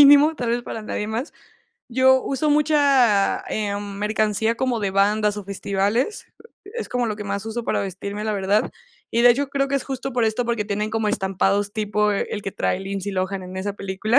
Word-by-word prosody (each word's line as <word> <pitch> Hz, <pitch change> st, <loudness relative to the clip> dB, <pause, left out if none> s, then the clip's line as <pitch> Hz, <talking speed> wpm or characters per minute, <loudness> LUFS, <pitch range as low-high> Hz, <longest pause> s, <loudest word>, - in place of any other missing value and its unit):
mínimo, 290 Hz, +2 st, +8 dB
tal 240 Hz, -2 st, -2 dB
vez 240 Hz, +1 st, 0 dB
para 225 Hz, -, -6 dB
nadie 210 Hz, -1 st, -3 dB
más. 230 Hz, +7 st, -3 dB, 0.6 s
Yo 260 Hz, +1 st, +4 dB
uso 275 Hz, +3 st, 0 dB
mucha, 280 Hz, -8 st, +4 dB
ah, -, -, -15 dB, 0.4 s
mm, 200 Hz, -1 st, -7 dB
mercancía 215 Hz, +1 st, +1 dB
como 250 Hz, -2 st, 0 dB
de 200 Hz, -2 st, -1 dB
bandas 205 Hz, +2 st, +2 dB
o 205 Hz, -, -6 dB
festivales, 200 Hz, -, -1 dB, 0.4 s
e 400 Hz, -, -12 dB
es 475 Hz, -, -4 dB
como 245 Hz, -1 st, 0 dB
lo 210 Hz, -1 st, -2 dB
que 210 Hz, -, -6 dB
más 200 Hz, +1 st, -3 dB
uso 230 Hz, +1 st, -4 dB
para -, -, 0 dB
vestirme, 200 Hz, +2 st, -5 dB
la 215 Hz, -, 0 dB
verdad. 200 Hz, +1 st, +1 dB, 0.4 s
Y, 235 Hz, -, +2 dB
de 245 Hz, -, +8 dB
hecho, 275 Hz, +3 st, +1 dB
creo 275 Hz, 0 st, 0 dB
que 280 Hz, -, -2 dB
es 275 Hz, -, +1 dB
justo 270 Hz, -1 st, -4 dB
por 240 Hz, -1 st, +1 dB
esto, 220 Hz, +3 st, 0 dB
porque 235 Hz, -3 st, -1 dB
tienen 210 Hz, +1 st, -2 dB
como 220 Hz, -1 st, 0 dB
estampados 195 Hz, +1 st, 0 dB
tipo 210 Hz, -1 st, +1 dB
el 205 Hz, +1 st, -2 dB
que 195 Hz, -, -4 dB
trae 185 Hz, -, 0 dB
Lindsay 195 Hz, +1 st, -4 dB
Lohan 190 Hz, 0 st, -2 dB
en 185 Hz, +1 st, -8 dB
esa 200 Hz, +2 st, -2 dB
película. 200 Hz, +6 st, +1 dB
215 Hz, 210 wpm, -23 LUFS, 200-250 Hz, 0.6 s, mínimo